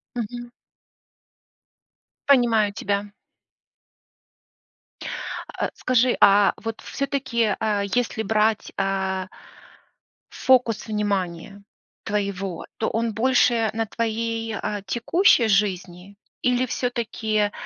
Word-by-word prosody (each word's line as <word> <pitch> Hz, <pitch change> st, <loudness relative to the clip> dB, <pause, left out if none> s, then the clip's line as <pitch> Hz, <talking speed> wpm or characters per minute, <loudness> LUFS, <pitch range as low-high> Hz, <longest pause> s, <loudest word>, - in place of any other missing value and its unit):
Мгм. 240 Hz, +1 st, -5 dB, 1.8 s
Понимаю 230 Hz, -6 st, +4 dB
тебя. 200 Hz, +1 st, -2 dB, 2.5 s
А, -, -, -1 dB
скажи, 255 Hz, 0 st, +2 dB
а, 200 Hz, 0 st, +6 dB
вот 225 Hz, -1 st, -6 dB
всё-таки, 265 Hz, -6 st, -1 dB
а, 210 Hz, -2 st, 0 dB
если 220 Hz, +2 st, -1 dB
брать, 220 Hz, 0 st, +1 dB
а 190 Hz, -1 st, -1 dB, 1.0 s
фокус 250 Hz, -4 st, +2 dB
внимания 200 Hz, -2 st, -3 dB, 0.4 s
твоего, 195 Hz, -3 st, -3 dB
то 220 Hz, -, 0 dB
он 230 Hz, 0 st, -1 dB
больше 235 Hz, -1 st, +3 dB
на 225 Hz, 0 st, -1 dB
твоей, 225 Hz, 0 st, -2 dB
а, 205 Hz, 0 st, -3 dB
текущей 235 Hz, -, +3 dB
жизни 195 Hz, -2 st, -1 dB, 0.2 s
или 250 Hz, 0 st, +2 dB
всё-таки 220 Hz, -4 st, -1 dB
220 Hz, 85 wpm, -23 LUFS, 200-235 Hz, 2.5 s, а